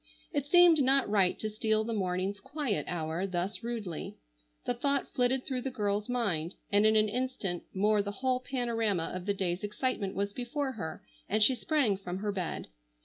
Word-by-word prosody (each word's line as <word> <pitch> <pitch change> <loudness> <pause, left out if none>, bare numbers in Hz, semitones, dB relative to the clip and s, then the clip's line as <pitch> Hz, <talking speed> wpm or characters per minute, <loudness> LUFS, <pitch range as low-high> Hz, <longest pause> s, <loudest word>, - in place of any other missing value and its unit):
It 285 -1 -1
seemed 345 -1 +7
not 270 +1 +4
right 200 -3 +3
to 215 - -2
steal 220 0 +1
the 230 +1 -3
morning's 190 0 -1
"quiet 265 -4 -2
hour" 170 +2 -2
thus 185 +3 -2
rudely. 225 -8 -5 0.5
The - - +1
thought 280 +3 0
flitted 255 +1 +1
through 255 -2 -2
the 265 - -2
girl's 210 -3 -1
mind, 195 -9 0 0.2
and 205 +1 +5
in 220 - +4
an 215 0 +5
instant 215 -6 -2
more 210 +2 +3
the 200 - -4
whole 255 -1 +2
panorama 230 -8 -1
of 185 +1 -5
the 200 - +1
day's 180 -1 -1
excitement 210 -1 -2
was 200 +1 -1
before 265 +4 -2
her, 160 -10 -6 0.3
and 215 +1 +4
she 260 - +6
sprang 255 -6 +1
from 180 -2 -5
her 205 +1 -2
bed. 185 -4 -3
215 Hz, 185 wpm, -31 LUFS, 195-255 Hz, 0.5 s, seemed